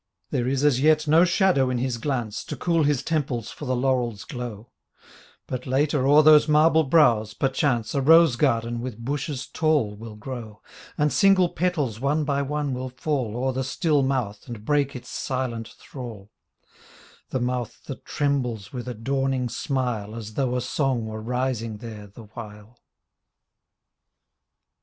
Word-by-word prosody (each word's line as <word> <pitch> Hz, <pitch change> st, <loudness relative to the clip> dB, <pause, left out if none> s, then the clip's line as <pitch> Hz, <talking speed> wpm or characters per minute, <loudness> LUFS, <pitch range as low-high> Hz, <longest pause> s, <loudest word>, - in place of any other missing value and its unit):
There 125 Hz, -1 st, 0 dB
is 135 Hz, +1 st, 0 dB
as 135 Hz, -3 st, +3 dB
yet 155 Hz, +1 st, +3 dB
no 160 Hz, +4 st, +6 dB
shadow 175 Hz, -7 st, +3 dB
in 125 Hz, -, -1 dB
his 120 Hz, -1 st, -2 dB
glance, 120 Hz, -6 st, -2 dB
Tco -, -, -6 dB
cool 170 Hz, -2 st, +1 dB
his 145 Hz, -3 st, +1 dB
temples 140 Hz, -8 st, -2 dB
for 150 Hz, -, -8 dB
the 130 Hz, -1 st, 0 dB
laurel's 125 Hz, -4 st, 0 dB
glow; 120 Hz, -6 st, -7 dB, 0.7 s
But 130 Hz, -, -5 dB
later 135 Hz, +1 st, +1 dB
o'er 150 Hz, +2 st, +7 dB
those 150 Hz, 0 st, +7 dB
marble 155 Hz, +1 st, +5 dB
brows, 120 Hz, -8 st, +3 dB
perchance, 130 Hz, -3 st, 0 dB
A 140 Hz, -, +1 dB
rose 160 Hz, -1 st, +6 dB
garden 120 Hz, -3 st, 0 dB
with 115 Hz, -2 st, -6 dB
bushes 140 Hz, 0 st, -3 dB
tall 150 Hz, -11 st, 0 dB
will 110 Hz, +1 st, -9 dB
grow, 110 Hz, -1 st, -8 dB, 0.3 s
And 150 Hz, 0 st, +1 dB
single 195 Hz, -3 st, +4 dB
petals 150 Hz, -13 st, -1 dB
one 145 Hz, +4 st, +1 dB
by 140 Hz, -1 st, 0 dB
one 145 Hz, 0 st, -2 dB
will 130 Hz, +1 st, -4 dB
fall 130 Hz, -4 st, -2 dB
O'er 130 Hz, +1 st, 0 dB
the 130 Hz, +1 st, -2 dB
still 145 Hz, +2 st, +1 dB
mouth 125 Hz, -7 st, -2 dB
and 115 Hz, -3 st, -8 dB
break 145 Hz, -1 st, +1 dB
its 125 Hz, 0 st, -8 dB
silent 125 Hz, -4 st, -3 dB
thrall, 115 Hz, -7 st, -9 dB, 0.5 s
— -, -, -24 dB
^The 130 Hz, -, 0 dB
mouth 125 Hz, -2 st, -3 dB
that 135 Hz, -, -8 dB
trembles 125 Hz, -8 st, -2 dB
with 125 Hz, -1 st, -5 dB
a 125 Hz, -, -4 dB
dawning 135 Hz, +2 st, -1 dB
smile 125 Hz, -7 st, -2 dB
As 110 Hz, -2 st, -7 dB
though 125 Hz, 0 st, 0 dB
a 125 Hz, -, 0 dB
song 130 Hz, -2 st, -1 dB
were 110 Hz, 0 st, -6 dB
rising 120 Hz, -2 st, -2 dB
there 105 Hz, -2 st, -9 dB
the 100 Hz, +4 st, -13 dB
while. 105 Hz, +1 st, -11 dB
130 Hz, 160 wpm, -24 LUFS, 115-145 Hz, 0.7 s, o'er